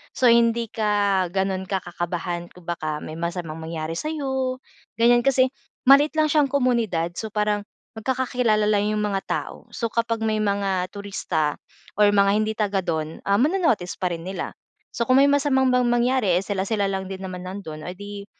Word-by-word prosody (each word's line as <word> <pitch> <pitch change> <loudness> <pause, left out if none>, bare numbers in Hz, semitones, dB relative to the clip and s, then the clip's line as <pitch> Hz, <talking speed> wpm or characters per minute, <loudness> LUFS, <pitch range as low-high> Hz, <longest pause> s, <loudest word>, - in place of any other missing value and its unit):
So, 255 - +1
hindi 235 0 +3
ka 205 -3 +1
gano'n 190 0 -1
ka 190 -2 0
kakabahan, 175 0 -4
kung 180 - -16
baka 155 -3 -2
may 155 - -7
masamang 170 -2 -4
mangyari 160 0 -4
sa'yo, 265 - -2 0.4
ganiyan, 240 +1 +5
kasi 260 -1 +3 0.4
maliit 290 +3 +6
lang 310 -1 +3
siyang 300 -2 +4
komunidad, 230 -11 +1
so, 220 - -4
parang 210 -1 +1 0.3
magkakakilala 245 -2 +1
lang 210 0 +2
yung 210 - 0
mga 195 -2 -1
tao. - - -4
So, 235 - -3
kapag 230 -1 0
may 215 -1 +1
mga 200 -3 0
turista, 185 -7 -2 0.4
or 210 -1 +6
mga 200 -1 +4
hindi 215 +1 +1
taga-do'n, 175 -7 -1
ah, 200 0 +4
mano-notice 295 - +1
pa 180 - +1
rin 165 0 -7
nila. 190 - -4 0.4
So, 235 - +1
kung 255 +1 +5
may 280 - +6
masamang 270 -2 +3
mang 250 0 +3
mangyari, 240 -6 +2
eh, - - -5
sila-sila 200 +1 -1
lang 190 -1 -3
din 190 0 -6
naman 180 -1 -6
nando'n, 165 -5 -7
o - - -3
di, 205 0 -8
205 Hz, 175 wpm, -23 LUFS, 180-240 Hz, 0.4 s, maliit